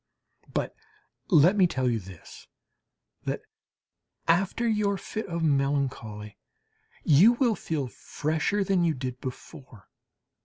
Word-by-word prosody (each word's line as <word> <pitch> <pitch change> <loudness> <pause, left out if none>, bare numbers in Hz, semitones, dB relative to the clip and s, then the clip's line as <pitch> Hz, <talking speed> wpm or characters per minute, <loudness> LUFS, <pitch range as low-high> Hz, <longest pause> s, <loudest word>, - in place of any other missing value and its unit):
But - - -2 0.5
let 175 +1 +6
me 190 -3 +5
tell 130 -6 -1
you 115 -2 +1
this, 95 -3 -13 0.8
that - - -2 0.9
after 195 +7 +2
your 210 -3 +1
fit 215 +3 -5
of 170 -2 -3
melancholy 135 -8 -1 0.6
you 170 +11 +6
will 240 -2 +2
feel 155 -9 -3
fresher 160 - -1
than 190 -2 +2
you 165 -2 +2
did 125 -1 -5
before. 130 - -9
155 Hz, 115 wpm, -27 LUFS, 130-195 Hz, 0.9 s, let